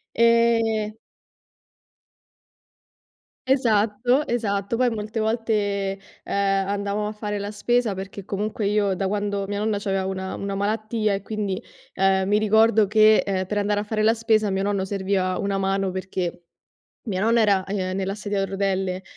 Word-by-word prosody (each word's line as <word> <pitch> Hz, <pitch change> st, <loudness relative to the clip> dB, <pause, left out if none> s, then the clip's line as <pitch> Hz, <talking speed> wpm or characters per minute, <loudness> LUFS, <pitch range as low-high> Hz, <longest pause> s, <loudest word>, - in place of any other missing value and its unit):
Ehm. 230 Hz, -2 st, +3 dB, 2.5 s
Esatto, 245 Hz, +1 st, +2 dB
esatto. 210 Hz, -2 st, -1 dB
Poi 250 Hz, 0 st, +2 dB
molte 215 Hz, 0 st, -4 dB
volte, 225 Hz, +1 st, 0 dB, 0.7 s
ehm, 195 Hz, -1 st, +1 dB
andavamo 200 Hz, +1 st, -2 dB
a 210 Hz, -, -3 dB
fare 210 Hz, -1 st, -4 dB
la 205 Hz, +1 st, -5 dB
spesa, 235 Hz, +1 st, +1 dB
perché 195 Hz, 0 st, -7 dB
comunque 210 Hz, +1 st, -2 dB
io 205 Hz, -1 st, +1 dB
da 195 Hz, -, -1 dB
quando 205 Hz, 0 st, -1 dB
mia 205 Hz, 0 st, -3 dB
nonna 210 Hz, -1 st, 0 dB
c'aveva 195 Hz, -2 st, -1 dB
una 190 Hz, 0 st, -4 dB
una 200 Hz, 0 st, -4 dB
malattia 215 Hz, +1 st, 0 dB
e 195 Hz, -, -3 dB
quindi, 205 Hz, -2 st, -3 dB, 0.3 s
ehm, 190 Hz, 0 st, +2 dB
mi 210 Hz, +1 st, +3 dB
ricordo 220 Hz, -1 st, +4 dB
che, 215 Hz, 0 st, +6 dB
ehm, 190 Hz, -2 st, -1 dB
per 210 Hz, +2 st, -2 dB
andare 205 Hz, 0 st, +1 dB
a 205 Hz, -, -2 dB
fare 215 Hz, 0 st, -1 dB
la 220 Hz, +1 st, +4 dB
spesa 220 Hz, -2 st, +2 dB
a -, -, -1 dB
mio 190 Hz, 0 st, -1 dB
nonno 200 Hz, -2 st, 0 dB
serviva 190 Hz, -1 st, -1 dB
una 200 Hz, 0 st, -1 dB
mano, 195 Hz, -1 st, 0 dB
perché 185 Hz, -2 st, -4 dB, 0.7 s
mia 190 Hz, -2 st, -1 dB
nonna 230 Hz, +2 st, +3 dB
era, 200 Hz, -3 st, +3 dB
ehm, 185 Hz, -1 st, -3 dB
nella 195 Hz, 0 st, -2 dB
sedia 205 Hz, -1 st, -2 dB
a -, -, +1 dB
rotelle, 190 Hz, -1 st, -1 dB
205 Hz, 160 wpm, -23 LUFS, 195-215 Hz, 2.5 s, che